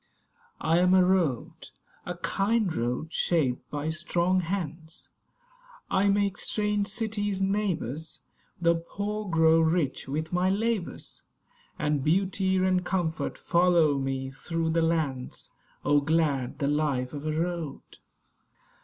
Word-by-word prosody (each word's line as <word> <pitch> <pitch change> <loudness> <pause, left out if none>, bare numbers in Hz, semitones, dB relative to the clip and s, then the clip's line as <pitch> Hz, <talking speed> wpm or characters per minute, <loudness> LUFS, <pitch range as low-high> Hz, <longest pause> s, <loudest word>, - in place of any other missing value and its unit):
I 165 +2 +2
am 180 +1 +4
a 185 -1 +6
Road; 165 -3 0 0.4
a 180 0 -4
kind 195 +3 0
road, 125 +6 -2
shaped 140 -8 0
by 150 +1 -3
strong 170 +2 +1
hands. 165 -3 -5 0.8
I 200 +1 +3
make 200 -1 +1
strange 210 -1 0
cities 205 -4 -1
neighbours; 180 - -2 0.4
The 170 -1 +4
poor 205 +5 -4
grow 160 -1 +5
rich 160 -5 +1
with 155 +4 -3
my 180 +1 +2
labours, 210 -1 -2 0.6
And 150 -2 0
beauty 190 +3 +1
and 185 -1 +2
comfort 175 -3 -2
follow 170 -5 +3
me 135 0 -3
through 160 +4 -2
the 165 0 +2
lands. 155 -6 -2 0.3
Oh, 145 +1 +4
glad 145 -5 0
the 140 -2 -1
life 145 -3 0
of 145 +1 -5
a 155 - 0
Road! 170 -4 -3
165 Hz, 125 wpm, -27 LUFS, 150-190 Hz, 0.8 s, a